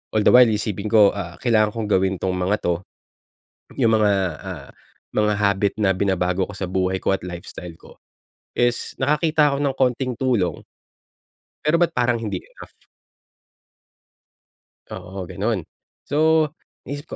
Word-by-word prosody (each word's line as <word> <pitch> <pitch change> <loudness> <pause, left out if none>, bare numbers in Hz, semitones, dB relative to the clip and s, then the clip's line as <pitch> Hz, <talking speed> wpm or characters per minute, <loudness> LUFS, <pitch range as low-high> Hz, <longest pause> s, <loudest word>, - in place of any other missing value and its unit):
all 105 - +3
the - - +7
while 125 0 +8
isipin 105 -1 -2
ko, 105 -2 +6
ah, 90 -4 -6
kailangan 110 -3 +2
kong 110 -2 -3
gawin 95 0 0
'tong 95 - 0
mga 90 +3 +1
'to. 85 0 0 1.0
Yung 115 -3 +4
mga, 105 -2 +3 0.3
ah, - - -8 0.5
mga 105 0 +2
habit 100 -1 +1
na 95 -2 +3
binabago 95 -1 0
ko - - -9
sa 95 - -3
buhay 95 +1 0
ko 95 - 0
at - - -4
lifestyle 85 -1 -8
ko - - -17 0.6
is 120 0 0
nakakita 150 +1 +3
ako - - -2
ng 140 -2 0
konting 130 0 +1
tulong. 120 -8 0 1.0
Pero 160 +3 +2
ba't 175 - +3
parang 120 -1 +1
hindi 110 -2 -3
enough. - - -15 2.2
Oo, 95 0 -7
ganun. 100 +2 -2 0.4
So, 155 +1 +2 0.3
inisip 145 +3 -7
105 Hz, 145 wpm, -22 LUFS, 95-125 Hz, 2.2 s, while